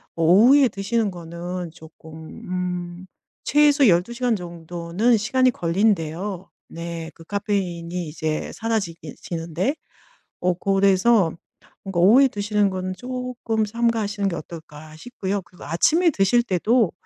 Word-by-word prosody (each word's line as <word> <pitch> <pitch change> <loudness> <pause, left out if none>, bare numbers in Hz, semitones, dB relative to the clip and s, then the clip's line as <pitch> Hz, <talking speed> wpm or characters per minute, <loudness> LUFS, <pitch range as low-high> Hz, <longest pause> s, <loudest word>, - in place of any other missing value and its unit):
어 165 - -1
오후에 245 - +6
드시는 210 +1 -1
거는 175 0 -6
조금 160 -1 -14 0.3
음 180 0 -4 0.4
최소 290 -2 +4
12 180 +5 +3
시간 245 -2 0
정도는 175 +5 -1
시간이 255 +4 +2
걸린대요. 185 0 -1 0.2
네 170 -1 -7
그 165 - -14
카페인이 180 -4 -3
이제 155 0 -3
사라지기 195 -9 -3
지는데. 170 - -2 0.7
어 180 0 +2
그래서 195 0 +3 0.5
뭔가 190 -3 -2
오후에 250 +9 +7
드시는 205 -2 0
거는 185 0 -4
쪼끔 250 -3 -3
삼가하시는 220 -2 -1
게 170 - -4
어떨까 155 -1 -10
싶고요. 200 -1 -4
그리고 180 - -16
아침에 320 - +3
드실 235 +2 +2
때도 215 +1 +2
190 Hz, 280 characters per minute, -23 LUFS, 170-225 Hz, 0.7 s, 오후에